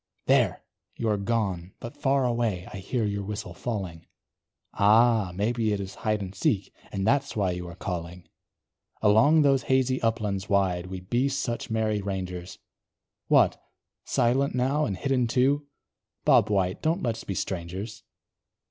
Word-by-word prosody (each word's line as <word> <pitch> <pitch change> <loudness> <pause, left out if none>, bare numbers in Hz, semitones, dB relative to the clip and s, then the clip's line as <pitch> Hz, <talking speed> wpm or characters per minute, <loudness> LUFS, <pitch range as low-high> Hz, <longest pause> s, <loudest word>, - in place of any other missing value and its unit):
There, - - +2 0.3
you 115 - -2
are 105 - +2
gone! 100 -4 -2
but 120 - -8
far 135 -1 +1
away 115 -7 -1
I - - -5
hear 110 +4 -2
your 100 -1 -2
whistle 105 +2 -5
falling, 95 -8 -5 0.7
Ah! 110 -1 +4
maybe 110 +2 0
it 100 - -2
is 95 -1 -5
hide 105 -1 0
and 95 0 -7
seek, 95 0 0 0.2
And 95 -1 -2
that's 140 +4 +1
why 100 -4 +1
you 90 0 -5
are 85 - -9
calling. 90 -1 -5 0.8
Along 115 +10 +5
those 135 -2 +4
hazy 130 0 +1
uplands 105 -4 -1
wide 90 -3 +1
We'd 95 0 -8
be 125 +3 +2
such 135 -3 -3
merry 110 -2 0
rangers; 90 -2 -5 0.7
What! - - +4 0.4
silent 130 +3 +1
now 135 +5 +1
and 95 - -3
hidden, 130 0 +1
too? 140 +5 +2 0.6
Bob 105 - +5
White, 95 -3 0
don't 165 +4 0
let's 115 -1 -2
be 100 - -4
strangers. 95 +5 -4
105 Hz, 150 wpm, -27 LUFS, 95-120 Hz, 0.8 s, Along